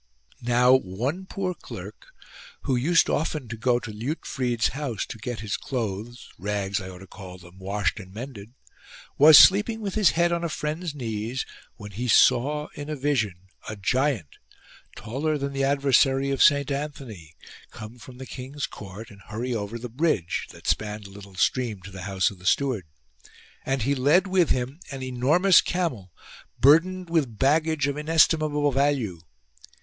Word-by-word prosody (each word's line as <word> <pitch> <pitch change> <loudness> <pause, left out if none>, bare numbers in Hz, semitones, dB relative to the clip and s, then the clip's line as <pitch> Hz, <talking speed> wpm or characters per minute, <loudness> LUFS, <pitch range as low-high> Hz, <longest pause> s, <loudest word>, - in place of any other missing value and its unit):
Now 125 +1 +4
one 130 - -1
poor 190 -2 -3
clerk, - - -10 0.5
who 130 - 0
used 165 +8 +3
often 150 -4 -1
to 115 - -4
go 120 +2 +1
to 115 - -8
Liutfrid's 120 -1 -2
house 130 -5 -4
to 115 - -9
get 120 +1 -5
his 105 -2 -3
clothes 120 -1 -5
(rags 100 -1 -2
I 95 - -7
ought 90 0 -11
to - - -10
call 95 -1 -11
them) 90 +1 -16
washed 95 -1 -1
and 95 -2 -11
mended, 115 0 -9 0.6
was 150 +1 +10
sleeping 210 +4 +6
with 200 -3 -4
his 210 -5 +4
head 170 0 +3
on 170 0 -1
a 170 - -1
friend's 155 +1 -4
knees, 115 -1 -3 0.3
when 105 -2 -10
he 120 +6 -4
saw 150 +6 +3
in 145 +1 -7
a 155 - -2
vision 110 - -2 0.2
a 110 - -5
giant, 120 - -1 0.6
taller 150 +7 -2
than 140 0 -4
the 135 0 -1
adversary 135 0 +3
of 135 - -1
Saint 140 -1 +4
Anthony, 130 - -6 0.3
come 110 +3 -10
from 125 +1 -12
the 130 - -8
king's 135 +3 -6
court 105 +4 -10
and 100 -1 -15
hurry 120 +4 -3
over 110 0 -4
the 120 +1 -6
bridge, 120 - -1
that - - -15
spanned 105 0 -1
a 100 - -11
little 100 -1 -13
stream, 115 +1 0
to 100 - -10
the 95 -1 -9
house 95 0 +1
of 95 - -14
the 90 - -7
steward; 125 - +1 0.8
and 135 -3 0
he 140 +4 +1
led 145 +8 +3
with 185 -3 +2
him 130 +5 -1
an 135 -2 -6
enormous 145 +10 +4
camel, 140 - -3 0.5
burdened 180 +7 +4
with 150 -10 0
baggage 155 +2 +2
of 140 -1 -1
inestim 160 +1 +4
able 150 -1 0
value. 135 - 0
130 Hz, 170 wpm, -25 LUFS, 105-150 Hz, 0.8 s, was